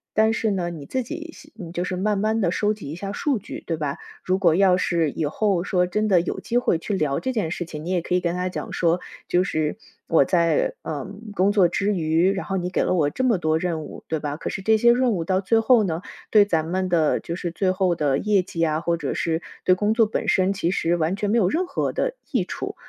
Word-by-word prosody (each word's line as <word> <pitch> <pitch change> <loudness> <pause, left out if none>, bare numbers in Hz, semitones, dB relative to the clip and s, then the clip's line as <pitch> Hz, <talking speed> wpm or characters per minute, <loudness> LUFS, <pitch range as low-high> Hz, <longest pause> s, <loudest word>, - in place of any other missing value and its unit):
但 220 +1 +4
是 225 -1 0
呢， 180 -3 -1
你 160 -5 -8
自 260 - -2
己 320 +6 -7
先 185 - -11
就 175 - -1
是 185 - -3
慢 205 +3 0
慢 220 +2 +1
地 180 -6 +1
收 210 +3 +1
集 200 -9 -8
一 - - -5
下 195 +3 -5
数 265 +3 -1
据， - - -8
对 165 - -2
吧？ 145 -2 -3 0.3
如 185 0 +1
果 175 -4 +4
要 185 -1 +4
是 170 -3 +1
以 155 +2 -2
后 185 +3 0
说 180 -2 +1
真 210 +4 0
的 185 -4 +4
有 175 - -4
机 240 - -1
会 245 - +1
去 185 +5 -4
聊 150 -7 0
这 260 - -2
件 210 -9 -1
事 175 +1 -4
情， 155 -2 -8
你 170 - -5
也 185 -1 +1
可 175 - -4
以 180 - +4
跟 175 -1 -1
他 180 0 -1
讲 185 - -5
说： 170 0 +2 0.3
"就 180 +1 +2
是 155 -5 -1 0.3
我 160 -4 +5
在， 165 +1 +1
呃， 145 -3 -4 0.3
工 195 +1 +2
作 200 -4 +4
的 170 - -11
时 200 - 0
候 - - +3
之 - - 0
余， 165 +4 +2
然 195 0 -3
后 195 - -2
你 180 -1 -2
给 185 - 0
了 - - +1
我 155 -5 +2
这 260 - -3
么 235 -7 +2
多 155 -1 +1
任 165 -1 -2
务， - - -10
对 160 - -1
吧？ 145 0 -4
可 - - -4
是 - - -5
这 220 +3 +3
些 235 +2 +5
任 250 -1 +2
务 175 -4 -1
到 185 +2 +1
最 225 +4 +2
后 225 0 +4
呢， 170 -2 -2 0.3
对 210 -2 +6
咱 160 -5 0
们 185 +2 -1
的 165 -3 +2
就 170 - -5
是 175 0 -3
最 185 +2 0
后 185 -2 +1
的 145 -3 +1
业 205 -3 +2
绩 165 -2 -3
啊， 155 -1 +1
或 170 0 +1
者 150 -4 -3
是 165 0 -1 0.2
对 185 - +5
工 205 +4 +1
作 225 -1 +5
本 215 0 -3
身 190 -1 +3
其 180 -3 -1
实 175 -2 +1
完 165 +2 0
全 205 0 -1
没 235 - +3
有 190 - +3
任 350 - 0
何 - - -2
的 - - -1 0.2
益 - - 0
处。” - - -5
180 Hz, 295 characters per minute, -23 LUFS, 165-210 Hz, 0.3 s, 对